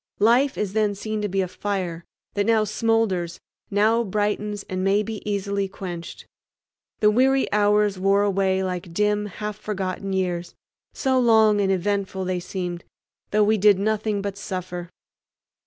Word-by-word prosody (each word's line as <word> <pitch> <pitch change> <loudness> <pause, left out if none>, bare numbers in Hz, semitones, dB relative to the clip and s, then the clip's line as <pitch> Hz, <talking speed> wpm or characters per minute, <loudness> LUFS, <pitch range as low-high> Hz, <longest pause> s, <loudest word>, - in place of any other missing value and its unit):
Life 245 +6 +3
is 200 -2 -2
then 210 -2 +1
seen 215 +1 -3
to 205 - -1
be 195 +1 0
a 185 - -1
fire, 180 -3 -4 0.3
that 205 0 0
now 225 -1 +4
smoulders, 215 -5 0 0.3
now 220 +3 +3
brightens, 210 0 -2
and 185 0 -3
may 200 +2 +3
be 220 -1 -6
easily 200 0 -1
quenched. 175 -3 -7 0.8
The 210 0 +5
weary 265 +4 +3
hours 210 -1 +3
wore 195 +1 +3
away 190 -1 +1
like 180 -2 -4
dim 210 +1 +1
half 210 +1 -6
forgotten 195 -2 -3
years, 180 -2 -2 0.4
so 260 -2 +1
long 220 -3 +5
and 195 -1 +2
eventful 190 0 -1
they 180 -1 -1
seemed, 175 -1 -5 0.5
though 210 +1 +3
we 215 +1 +2
did 205 0 +6
nothing 210 0 -1
but 200 -1 -4
suffer. 180 -3 -5
205 Hz, 155 wpm, -24 LUFS, 190-210 Hz, 0.8 s, did